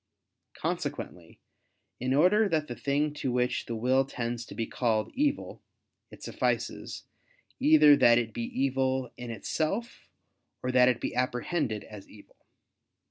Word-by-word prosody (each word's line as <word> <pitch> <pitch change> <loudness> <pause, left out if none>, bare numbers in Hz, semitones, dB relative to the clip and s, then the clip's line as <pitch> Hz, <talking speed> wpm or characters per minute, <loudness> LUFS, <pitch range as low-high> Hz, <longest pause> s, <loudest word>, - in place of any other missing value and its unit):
Consequently - - -5 0.6
in 130 +1 -2
order 200 +8 +4
that 155 -3 0
the 120 - -5
thing 145 +3 0
to 135 -3 -3
which 125 0 0
the 115 - -3
will 130 +4 +2
tends 120 -3 -4
be 115 - -4
called 110 -3 -1
evil, 285 +1 -1 0.5
it - - -14
suffices, - - -2 0.6
either 280 - +7
that 120 -3 +5
it 115 -2 -1
be 115 - -3
evil 130 -1 -1
in 120 -1 -8
itself, 160 - -3 0.5
or 125 - -1
that 125 0 +5
it 125 - 0
be - - -3
apprehended 125 - -1
as 105 -2 -12
evil. 105 - -18
130 Hz, 135 wpm, -28 LUFS, 120-150 Hz, 0.6 s, either